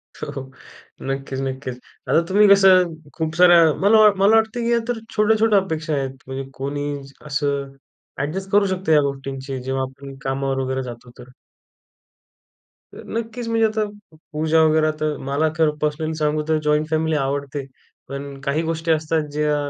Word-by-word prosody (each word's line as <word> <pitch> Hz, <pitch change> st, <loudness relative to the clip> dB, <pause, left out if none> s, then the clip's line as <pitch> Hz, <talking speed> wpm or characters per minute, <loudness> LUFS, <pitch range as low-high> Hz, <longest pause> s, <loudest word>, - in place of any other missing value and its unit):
हो, -, -, -6 dB
हो. 135 Hz, -1 st, -7 dB, 0.6 s
नक्कीच 135 Hz, 0 st, -3 dB
नक्कीच. 130 Hz, -1 st, -4 dB, 0.3 s
आता 165 Hz, -, +4 dB
तुम्ही 205 Hz, +2 st, +5 dB
कसं, 190 Hz, -3 st, +6 dB, 0.2 s
खूप 160 Hz, -1 st, -2 dB
साऱ्या 175 Hz, 0 st, +7 dB, 0.2 s
मला 210 Hz, +3 st, +5 dB, 0.2 s
मला 200 Hz, +3 st, +5 dB
वाटतं, 225 Hz, +1 st, +2 dB
की 235 Hz, 0 st, 0 dB
या 235 Hz, -, +3 dB
तर 245 Hz, -2 st, -2 dB, 0.2 s
छोट्या-छोट्या 215 Hz, 0 st, +4 dB
अपेक्षा 160 Hz, -4 st, -3 dB
आहेत. 135 Hz, -2 st, -2 dB
म्हणजे 135 Hz, 0 st, -6 dB
कोणी 140 Hz, +2 st, -4 dB, 0.4 s
असं 140 Hz, -1 st, -2 dB, 0.5 s
ॲडजस्ट 180 Hz, +8 st, -3 dB
करू 205 Hz, 0 st, +4 dB
शकतो 190 Hz, -3 st, -2 dB
या 150 Hz, -1 st, +6 dB
गोष्टींशी, 135 Hz, -1 st, -4 dB
जेव्हा 130 Hz, +1 st, -1 dB
आपण 135 Hz, +1 st, -9 dB
कामावर 135 Hz, 0 st, -1 dB
वगैरे 130 Hz, 0 st, -2 dB
जातो, 120 Hz, -1 st, -9 dB
तर. 125 Hz, -, -12 dB, 1.7 s
नक्कीच, 230 Hz, +1 st, -5 dB
म्हणजे 225 Hz, 0 st, +2 dB
आता 215 Hz, 0 st, -1 dB, 0.5 s
पूजा 160 Hz, +1 st, +2 dB
वगैरे 155 Hz, 0 st, +3 dB
तर 155 Hz, -1 st, -1 dB
मला 150 Hz, +3 st, +1 dB
खरं 155 Hz, -2 st, +2 dB
पर्सनली 150 Hz, +1 st, -2 dB
सांगू 150 Hz, 0 st, 0 dB
तर 160 Hz, -, +3 dB
जॉइंट 150 Hz, +1 st, +1 dB
फॅमिली 160 Hz, 0 st, +1 dB
आवडते. 140 Hz, 0 st, -2 dB, 0.4 s
पण 140 Hz, 0 st, -7 dB
काही 140 Hz, +3 st, 0 dB
गोष्टी 165 Hz, 0 st, -1 dB
असतात, 160 Hz, 0 st, +1 dB
ज्या 150 Hz, 0 st, 0 dB
150 Hz, 155 wpm, -21 LUFS, 135-185 Hz, 1.7 s, साऱ्या